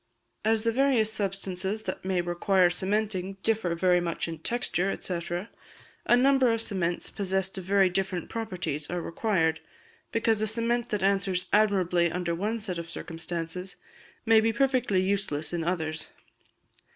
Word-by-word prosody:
As 220 0 +2
the 230 - +2
various 240 -4 +3
substances 195 0 -2
that 185 - -5
may 185 -1 0
require 175 +1 +2
cementing 195 0 -1
differ 215 -6 +1
very 180 +1 +3
much 170 -1 -2
in 165 -1 -6
texture, 195 -1 -1
&c., 180 -2 -3 0.9
a 240 - +6
number 265 -1 +4
of 230 - 0
cements 180 -6 -1
possessed 190 -1 0
of 185 - -9
very 195 0 +4
different 185 -1 -2
properties 175 -9 -4
are 175 - -2
required, 165 -3 0 0.5
because 225 -1 +2
a 215 - +1
cement 235 +2 0
that 205 -3 -1
answers 195 -2 +1
admirably 185 -5 +3
under 175 0 -2
one 210 +7 -2
set 185 -5 -3
of 170 0 -7
circumstances 170 +2 -5 0.5
may 225 -1 +6
be 225 +1 +2
perfectly 250 -6 +2
useless 185 -6 -1
in 170 -1 -1
others. 160 -2 -2
190 Hz, 150 wpm, -28 LUFS, 175-220 Hz, 0.9 s, a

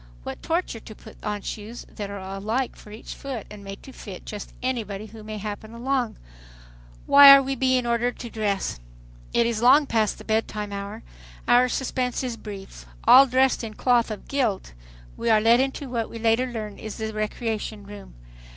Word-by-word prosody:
What - - -7
torture 330 -8 -1
to 215 - -12
put - - -15
on 210 -1 -3
shoes 220 +3 -7
that 205 -2 -7
are 200 - -6
alike 200 +7 -3
for - - -15
each 215 +2 -8
foot 260 -6 -6
and 210 -1 -10
made 195 0 -9
to 270 - -11
fit 195 -7 -9
just 210 -2 -7
anybody 215 -5 -2
who 220 0 -12
may 215 0 -6
happen 210 +2 -6
along. 250 -1 -1 0.9
Why 280 0 +10
are 275 - +4
we 270 +1 -2
being 255 -1 +1
ordered 240 +1 0
to 235 - -7
dress? 205 - -2 0.5
It 235 - +3
is 230 -2 -1
long 270 +5 +6
past 220 -5 +1
the - - -11
bed 220 0 +1
time 210 -1 -5
hour. 200 +3 -6 0.4
Our 245 +1 +5
suspense 255 0 -1
is 250 -2 -3
brief. 195 - -10 0.2
All 270 +2 +8
dressed 260 0 +2
in 220 -2 -6
cloth 240 -1 +2
of 215 - -7
"guilt" 230 - -1 0.4
we 235 - -1
are 220 -1 +6
led 230 +3 +5
into 270 +1 -1
what 235 -3 -2
we - - -8
later 230 +3 +2
learn 215 -4 -6
is 215 -1 -7
the 220 -1 -4
"recreation" 215 -1 -3
room. 205 -1 -11
225 Hz, 190 wpm, -25 LUFS, 210-250 Hz, 0.9 s, Why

